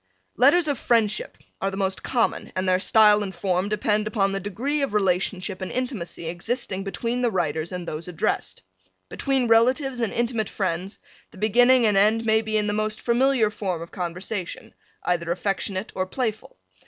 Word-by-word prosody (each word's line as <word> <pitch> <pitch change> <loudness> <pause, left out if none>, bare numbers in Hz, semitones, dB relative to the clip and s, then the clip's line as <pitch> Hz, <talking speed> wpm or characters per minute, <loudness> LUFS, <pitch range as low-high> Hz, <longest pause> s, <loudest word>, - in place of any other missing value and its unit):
Letters 300 +7 +5
of 285 -4 -1
friendship 220 -4 +1 0.2
are 195 - +1
the 195 - -6
most 190 -1 -1
common 240 -3 -1
and 185 0 -1
their 185 0 +3
style 210 +1 +5
and 195 -2 -4
form 185 0 0
depend 210 0 0
upon 200 -3 +1
the 195 - -2
degree 235 +10 -2
of 275 -7 -1
relationship 190 0 0
and 185 - -4
intimacy 245 -10 -4
existing 190 +3 -3
between 230 +5 -2
the 245 - +2
writers 160 -4 -1
and 180 -2 -5
those 155 +3 -5
addressed. 170 -3 -2 0.5
Between 270 -3 0
relatives 250 +3 +3
and 230 -3 0
intimate 235 -3 -1
friends 185 0 -3 0.3
the - - -17
beginning 245 +4 +4
and 210 -2 +3
end 220 +3 +3
may 220 0 +3
be 215 -1 -1
in 210 - +1
the 205 - -1
most 215 0 -2
familiar 240 -2 +2
form 190 -5 -3
of 170 - -12
conversation, 180 +2 -5 0.3
either 170 -1 -1
affectionate 195 +2 -2
or 185 0 -2
playful. 220 - -4
210 Hz, 175 wpm, -24 LUFS, 185-235 Hz, 0.5 s, Letters